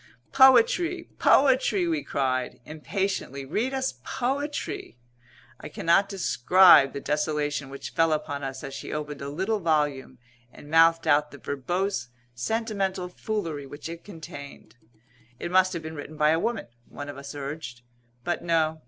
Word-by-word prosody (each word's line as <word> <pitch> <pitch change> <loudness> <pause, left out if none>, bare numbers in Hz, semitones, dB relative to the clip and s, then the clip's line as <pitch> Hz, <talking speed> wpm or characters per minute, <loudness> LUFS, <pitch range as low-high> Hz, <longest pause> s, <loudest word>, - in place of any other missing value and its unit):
"Poetry! 270 +7 +4
Poetry!" 255 -9 +4
we 160 -3 0
cried, 130 -2 -1
impatiently. 155 -3 -3
"Read 220 - -1
us 265 -1 -2
poetry!" 275 - -3 0.6
I - - -8
cannot 195 +4 +2
describe 180 -5 +5
the - - -4
desolation 150 -1 -1
which 140 0 -8
fell 165 -2 +2
upon 145 -2 -2
us 135 -1 -5
as 135 - -6
she - - -7
opened 150 -1 -5
a 140 - -4
little 190 +9 -1
volume 150 -6 0 0.3
and 145 +4 -14
mouthed 165 0 +5
out 150 0 +3
the 145 - -12
verbose, 175 +3 -2 0.2
sentimental 195 - -2
foolery 170 -8 -4
which 145 +3 -8
it 170 0 -8
contained. 145 - -11 0.6
"It 175 - -5
must 185 0 +4
have 170 -2 -5
been 160 0 -6
written 155 0 -8
by 150 0 +4
a 160 - +2
woman," 230 +2 -2 0.2
one 145 - -8
of 145 -1 -7
us 140 +1 -9
urged. 140 -4 -6 0.4
But 175 - -2
no. 160 -2 +1
160 Hz, 150 wpm, -26 LUFS, 145-195 Hz, 0.6 s, describe